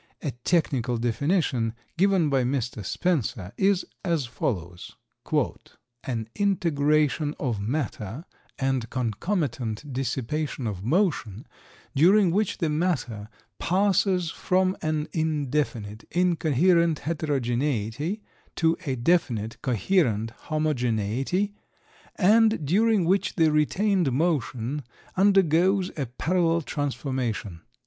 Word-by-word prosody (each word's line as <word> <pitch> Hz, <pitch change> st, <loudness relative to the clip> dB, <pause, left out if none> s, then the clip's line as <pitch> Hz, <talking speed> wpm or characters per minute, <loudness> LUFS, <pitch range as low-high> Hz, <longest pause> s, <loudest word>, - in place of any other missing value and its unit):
A 145 Hz, -, -1 dB
technical 125 Hz, -2 st, 0 dB
definition, 120 Hz, -, 0 dB, 0.2 s
given 185 Hz, -4 st, +3 dB
by 135 Hz, -1 st, +3 dB
Mr. 125 Hz, -4 st, -2 dB
Spencer, 120 Hz, -, -1 dB
is 195 Hz, -1 st, +2 dB, 0.2 s
as 165 Hz, -7 st, 0 dB
follows: 90 Hz, -7 st, -4 dB, 1.1 s
"An 115 Hz, -4 st, -3 dB
integration 155 Hz, -6 st, +1 dB
of 120 Hz, -7 st, -1 dB
matter 120 Hz, -, -3 dB, 0.3 s
and 130 Hz, -4 st, -1 dB
concomitant 130 Hz, -, -2 dB
dissipation 135 Hz, +2 st, -2 dB
of 100 Hz, -4 st, -4 dB
motion, 135 Hz, -, 0 dB, 0.5 s
during 185 Hz, +5 st, +5 dB
which 205 Hz, +2 st, 0 dB
the 165 Hz, -, 0 dB
matter 150 Hz, -, -1 dB, 0.3 s
passes 185 Hz, -2 st, +2 dB
from 185 Hz, +1 st, +1 dB
an 155 Hz, -1 st, -1 dB
indefinite, 145 Hz, -9 st, -1 dB
incoherent 170 Hz, -1 st, +2 dB
heterogeneity, 145 Hz, -, -1 dB, 0.3 s
to 165 Hz, 0 st, +2 dB
a 135 Hz, -, 0 dB
definite, 120 Hz, -6 st, 0 dB
coherent 120 Hz, -, +1 dB, 0.2 s
homogeneity, 135 Hz, -, 0 dB, 0.6 s
and 215 Hz, -2 st, +4 dB
during 205 Hz, +4 st, +3 dB
which 190 Hz, +3 st, +1 dB
the 160 Hz, -3 st, +4 dB
retained 175 Hz, +2 st, +2 dB
motion 140 Hz, -3 st, -1 dB, 0.3 s
undergoes 190 Hz, -1 st, +3 dB
a 140 Hz, -4 st, -2 dB
parallel 165 Hz, +6 st, +1 dB
transformation." 130 Hz, -, -3 dB
150 Hz, 95 wpm, -26 LUFS, 120-175 Hz, 1.1 s, during